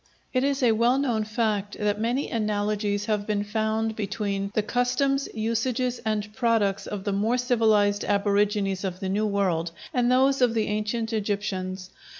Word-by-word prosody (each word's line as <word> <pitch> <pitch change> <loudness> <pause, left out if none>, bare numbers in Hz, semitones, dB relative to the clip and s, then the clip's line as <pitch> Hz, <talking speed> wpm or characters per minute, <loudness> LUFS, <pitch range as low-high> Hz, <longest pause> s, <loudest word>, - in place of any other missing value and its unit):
It 255 0 +2
is 275 -1 0
a 240 - +5
well 235 +4 +3
known 240 -6 0
fact 215 -2 -1
that 210 0 0
many 245 +5 -1
analogies 210 -2 -1
have 210 -2 -1
been 205 -1 0
found 220 +1 -1
between 200 -2 -2
the 215 - +2
customs, 250 +4 0
usages, 235 +3 -1
and 210 -1 -2
products 225 -5 +1
of 205 -2 -5
the 200 -1 -1
more 220 +5 +1
civilized 220 -5 +2
aborigines 200 -1 +1
of 185 -2 -3
the 190 -2 -3
New 210 +3 +1
World 185 -5 0 0.2
and 245 0 +2
those 265 +1 +3
of 240 -2 +3
the 220 -1 +1
ancient 215 +2 -2
Egyptians. 195 -3 -3
215 Hz, 160 wpm, -26 LUFS, 205-235 Hz, 0.2 s, a